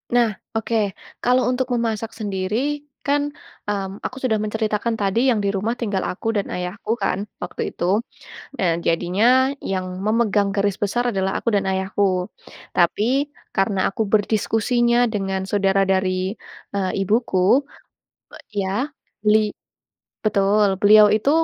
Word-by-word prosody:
Nah, 240 -1 +5 0.3
oke. 225 +1 -1 0.5
Kalau 250 +1 +3
untuk 255 0 -1
memasak 225 -2 -1
sendiri, 215 +9 -2 0.2
kan, 285 +1 +2 0.4
mmm, 200 -1 -4
aku 255 - -4
sudah 240 -4 +2
menceritakan 215 +1 -1
tadi 200 +2 +1
yang 225 - +1
di 200 - +1
rumah 210 +4 0
tinggal 205 -5 -1
aku 180 - -6
dan 200 - -1
ayahku, 180 +4 -4
kan, 185 - 0 0.2
waktu 175 - -5
itu. - - -3 0.7
Eee, 170 -3 +2
jadinya 175 +5 +1 0.4
yang 185 -1 -2 0.2
memegang 215 -2 +2
garis 200 -1 +1
besar 240 +4 0
adalah 190 0 0
aku - - -3
dan 195 - +1
ayahku. 190 -1 0 0.5
Tapi, 245 - +2 0.3
karena 195 0 +1
aku 210 - -2
berdiskusinya 225 +3 +2 0.2
dengan 195 -1 -1
saudara 195 -1 +2
dari, 190 +1 0 0.4
eee, 190 -2 0 0.2
ibuku, 215 +3 +3 0.7
pe - - -11 0.2
ya, 200 +9 -1 0.3
beli 215 0 +3 0.7
betul, 205 0 +3
beliau 210 +1 +8
itu, 220 +6 +1
205 Hz, 130 wpm, -22 LUFS, 190-230 Hz, 0.7 s, beliau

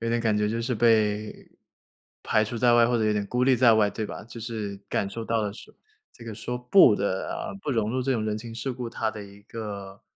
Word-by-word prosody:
有 115 - -2
点 120 0 +1
感 110 -2 +1
觉 105 0 +1
就 115 +1 -2
是 125 +2 -1
被 110 -2 +1 0.7
排 110 - +2
除 115 +2 -5
在 120 0 +4
外， 120 -1 +6
或 120 0 +1
者 110 - +1
有 105 - +2
点 105 -1 -1
孤 125 +3 -1
立 130 -1 +4
在 120 -1 +6
外， 110 -2 +3
对 110 - -4
吧？ - - -8
就 115 +1 -11
是 110 -3 -5
感 100 - -1
受 115 +3 -6
到 115 0 0
的 105 - -2
是， - - -13 0.4
这 - - -15
个 115 -2 -6
说 125 +3 -4
不 125 - +6
的， 100 -2 -2 0.2
嗯， 200 - -9
不 150 - -3
融 110 -4 0
入 130 +2 -1
这 135 +1 0
种 115 - -1
人 105 -1 -1
情 115 +1 -8
世 125 +3 -3
故 120 -2 -6
它 110 -1 -2
的 110 -1 -8
一 100 0 -14
个， 100 -3 -8
115 Hz, 280 characters per minute, -26 LUFS, 105-120 Hz, 0.7 s, 外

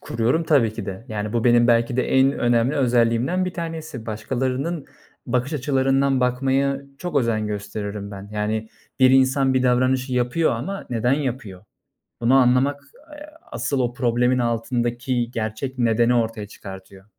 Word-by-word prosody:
Kuruyorum 120 +9 0
tabii 125 -9 +3
ki 110 -3 -6
de. 95 +3 -6
Yani, 105 -1 -4
bu 115 0 0
benim 120 -1 +5
belki 120 +1 +2
de 130 - 0
en 135 +1 +4
önemli 120 +2 +1
özelliğimden 125 +6 +2
1 185 - -4
tanesi. 160 -8 -6
Başkalarının 130 +8 -3 0.4
bakış 125 +3 -1
açılarından 135 -1 +1
bakmaya 135 +2 +1 0.2
çok 175 -4 -4
özen 115 -5 +1
gösteririm 105 0 -5
ben. 100 0 -9
Yani, 110 +1 -2 0.3
bir 130 0 +7
insan 130 0 +3
bir 130 - +2
davranışı 130 +1 +1
yapıyor 125 +6 +1
ama 145 +13 -5
neden 120 +2 +1
yapıyor? 125 -9 -3 0.6
Bunu 120 +3 +3
anlamak, 135 +3 +3 0.3
eee, 295 0 -10 0.2
asıl 140 - -2
o 120 -1 0
problemin 125 +1 +1
altındaki 120 +1 -1
gerçek 115 +4 -4
nedeni 120 +1 +3
ortaya 115 -3 -1
çıkartıyor. 95 -1 -11
125 Hz, 145 wpm, -22 LUFS, 115-135 Hz, 0.6 s, bir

